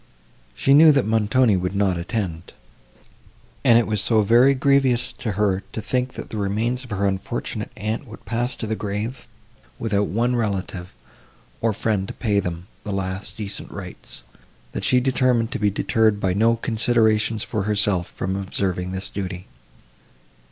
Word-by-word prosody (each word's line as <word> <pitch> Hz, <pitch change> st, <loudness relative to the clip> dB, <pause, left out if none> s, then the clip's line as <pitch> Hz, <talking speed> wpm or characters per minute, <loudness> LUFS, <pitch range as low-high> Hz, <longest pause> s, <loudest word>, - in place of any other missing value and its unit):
She 135 Hz, -, +3 dB
knew, 155 Hz, +2 st, +8 dB
that 135 Hz, -2 st, +2 dB
Montoni 110 Hz, +1 st, +3 dB
would 90 Hz, +1 st, -2 dB
not 100 Hz, -2 st, +2 dB
attend; 85 Hz, -2 st, -4 dB, 1.1 s
and 115 Hz, -, +6 dB
it 120 Hz, -, +3 dB
was 105 Hz, -2 st, -1 dB
so 110 Hz, -1 st, +3 dB
very 120 Hz, +6 st, +5 dB
grievous 135 Hz, -3 st, +2 dB
to 115 Hz, -5 st, -2 dB
her 100 Hz, -2 st, +1 dB
to -, -, -3 dB
think 125 Hz, +3 st, -1 dB
that -, -, -8 dB
the 110 Hz, -, -4 dB
remains 110 Hz, +6 st, -1 dB
of 125 Hz, -, -12 dB
her 100 Hz, -2 st, -1 dB
unfortunate 95 Hz, -1 st, -3 dB
aunt 110 Hz, +6 st, -3 dB
would 110 Hz, -, -12 dB
pass 120 Hz, +4 st, -2 dB
to -, -, -5 dB
the 110 Hz, 0 st, -1 dB
grave 105 Hz, +5 st, -4 dB, 0.5 s
without 105 Hz, -2 st, 0 dB
one 120 Hz, +5 st, 0 dB
relative, 95 Hz, -5 st, -3 dB, 0.7 s
or 115 Hz, -, +2 dB
friend 105 Hz, -2 st, -1 dB
to -, -, -7 dB
pay 105 Hz, -3 st, +1 dB
them 85 Hz, -2 st, -4 dB, 0.2 s
the 105 Hz, -, -5 dB
last 95 Hz, 0 st, -4 dB
decent 105 Hz, -3 st, -4 dB
rites, -, -, -10 dB, 0.5 s
that -, -, -5 dB
she 125 Hz, -, +4 dB
determined 125 Hz, -2 st, +1 dB
to -, -, -3 dB
be 105 Hz, 0 st, +3 dB
deterred 110 Hz, +1 st, +1 dB
by 95 Hz, -2 st, 0 dB
no 115 Hz, +4 st, +3 dB
considerations 110 Hz, -2 st, +2 dB
for 110 Hz, -, -2 dB
herself, 100 Hz, -4 st, +2 dB
from 95 Hz, +1 st, -4 dB
observing 95 Hz, -2 st, -2 dB
this 95 Hz, +1 st, -3 dB
duty. 95 Hz, -2 st, -5 dB
105 Hz, 165 wpm, -22 LUFS, 100-120 Hz, 1.1 s, knew